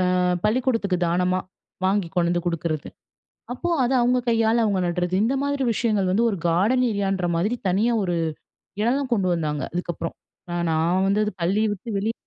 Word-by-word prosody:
ஆ - - +2 0.3
பள்ளிக்கூடத்துக்கு 230 -4 +1
தானமா 180 +2 +1 0.5
வாங்கி 190 -2 +1
கொண்டந்து 175 0 +2
குடுக்கிறது. 165 -3 -2 0.7
அப்போ 345 +8 -3
அத 245 - 0
அவுங்க 250 +1 +3
கையால 225 0 +3
அவுங்க 200 -3 +1
நட்றது. 180 +1 -1
இந்த 245 +5 +1
மாதிரி 285 -1 -1
விஷயங்கள் 210 -4 +1
வந்து 220 +5 +2
ஒரு 195 - -3
கார்டன் 210 +10 +2
ஏரியான்றமாதிரி 195 0 0
தனியா 215 +6 +2
ஒரு 175 -2 -1 0.7
எடம்லாம் 255 +4 0
கொண்டு 195 -5 +1
வந்தாங்க, 150 -3 -2
அதுக்கப்புறம். 175 -1 -4 0.4
நான் 175 0 -1
நான் 170 +4 +2
வந்தது 210 +2 +2
பள்ளிய 200 +6 +2
விட்டு 205 +4 -9
வெளிய 220 +3 -1
195 Hz, 150 wpm, -23 LUFS, 175-230 Hz, 0.7 s, அவுங்க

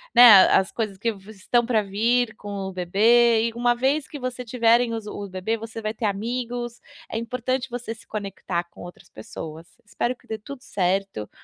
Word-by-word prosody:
né, 225 -6 +10
as 190 +1 +3
coisas 215 -4 -3
que 230 +3 0
vo 195 0 -14
estão 230 +4 0
para 230 -3 +2
vir 225 +4 +1
com 205 - -10 0.2
o - - -5
bebê, 225 +6 +4
e - - -12
uma 240 +1 +2
vez 270 +4 0
que 300 - -8
vocês 250 -2 -5
tiverem 235 0 +3
os 225 -2 -5
o 205 -1 -6
bebê, 185 +4 -2
você 225 0 -7
vai 215 0 -2
ter 225 - -4
amigos. 240 +3 -3 0.3
É - - -3
importante 250 +3 -2
você 245 -2 -5
se 225 - -17
conectar 195 -4 -4
com 170 - -16
outras 175 0 -11
pessoas. 160 +8 -9 0.2
Espero 240 +4 -2
que - - -27
dê 220 - -4
tudo 255 +4 -10
certo. 190 - -1
225 Hz, 195 wpm, -24 LUFS, 195-240 Hz, 0.3 s, né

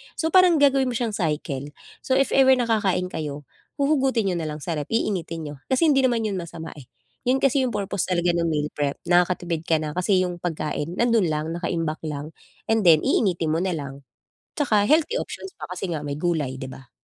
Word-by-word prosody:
So, 320 0 -1
parang 365 -1 +6
gagawin 275 -3 +4
mo 245 - -2
siyang 230 -2 -1
cycle, 150 -7 -2 0.3
so, 260 - 0
if 275 0 +2
ever 265 -1 +6
na 250 - 0
kakain 200 -5 0
kayo, 150 -2 -5 0.3
huhugutin 270 -8 +1
niyo 175 - -2
nalang 155 -2 -5
sa 175 - -3
ref 145 - -5
iinitin 165 -8 -2
n'yo 145 - -11
kasi 260 +5 +1
hindi 270 - +4
naman 235 -3 0
yun 200 -3 -2
masama, 165 -1 -7
eh, 130 - -14 0.4
yun 265 +2 +2
kasi 275 0 +3
yung 240 - -4
purpose 200 -1 -2
talaga 175 -1 +1
ng 170 -1 0
meal 150 -2 -1
prep, 145 -1 -2
nakakatipid 175 -2 +1
ka 165 - +3
na 150 - -3
kasi 185 +3 +2
yung 180 -1 -4
pagkain 160 -1 -3
nandun 230 -5 +2
lang 155 +1 -2
nakaimbak 165 -2 -2
lang, 150 +1 -5 0.4
and 220 -5 +2
then 155 -2 +6
iinitin 175 -7 +1
mo 160 - +1
na 185 -1 -1
lang, 140 -2 -6 0.5
'tsaka 215 -8 +2
healthy 315 - +3
options 390 - -6
pa - - -6
kasi 185 +1 -4
nga 155 -3 -3
may 145 - -3
gulay, 155 -6 -1
'di 130 - -5
ba? 130 -1 -12
175 Hz, 210 wpm, -24 LUFS, 155-235 Hz, 0.5 s, parang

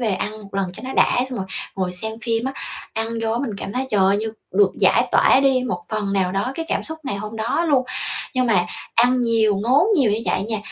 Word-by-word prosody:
về 220 -5 +1
ăn 205 +3 -3
một 195 -1 -14
lần 195 -2 -1
cho - - -10
nó 260 - -4
đã, - - +3
xong 250 - -4
rồi 190 - -3 0.3
ngồi 185 -2 -1
xem 220 +5 -2
phim 230 -1 0
á, 265 - -2 0.4
ăn 225 0 -2
vô 225 0 0
á, 230 - 0
mình 265 -2 -2
cảm 195 - -5
thấy 260 +3 -2
trời 210 -3 +2
ơi, 190 +1 +4
như 220 +1 -3 0.2
được 195 0 +4
giải - - +4
tỏa 265 - +5
đi 265 -2 +3
một 180 -8 -3
phần 210 -2 -2
nào 190 -2 +1
đó 200 +7 -1
cái 330 - -4
cảm - - -1
xúc 320 0 -4
ngày 265 -8 -3
hôm 215 +2 -6
đó 230 +10 0
luôn. 270 -4 +3 0.5
Nhưng 255 -1 +2
mà 185 -6 +3 0.3
ăn 250 +2 +4
nhiều, 225 -3 +2
ngốn 255 - +3
nhiều 260 -9 +3
như 210 - 0
vậy - - +1
nha, 220 +1 -2
220 Hz, 260 wpm, -21 LUFS, 195-255 Hz, 0.5 s, tỏa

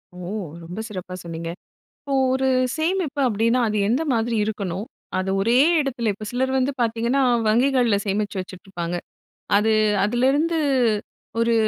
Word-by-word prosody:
ஓ! - - -11 0.5
ரொம்ப 175 +5 -7
சிறப்பா 185 -3 -7
சொன்னீங்க. 165 0 -5 0.5
இப்போ 280 -1 -6 0.2
ஒரு 265 0 +1 0.3
சேமிப்பு 320 -3 -1
அப்படின்னா 230 +3 +2
அது 215 - -1
எந்த 250 +8 +2
மாதிரி 230 0 0
இருக்கணும்? 200 -2 -3 0.3
அது 185 +1 -1
ஒரே 230 +5 +3 0.2
இடத்துல 245 -6 -1
இப்ப 215 +2 -8
சிலர் 260 +2 0
வந்து 260 +2 +1
பாத்தீங்கன்னா, 235 +3 +1 0.3
வங்கிகள்ல 245 -1 +3
சேமிச்சு 205 +1 -1
வச்சுட்ருப்பாங்க. 180 -2 -5 0.6
அது 220 +2 +3 0.3
அதிலேருந்து 270 +9 +2 0.8
ஒரு 230 0 +3
230 Hz, 130 wpm, -23 LUFS, 200-260 Hz, 0.8 s, ஒரே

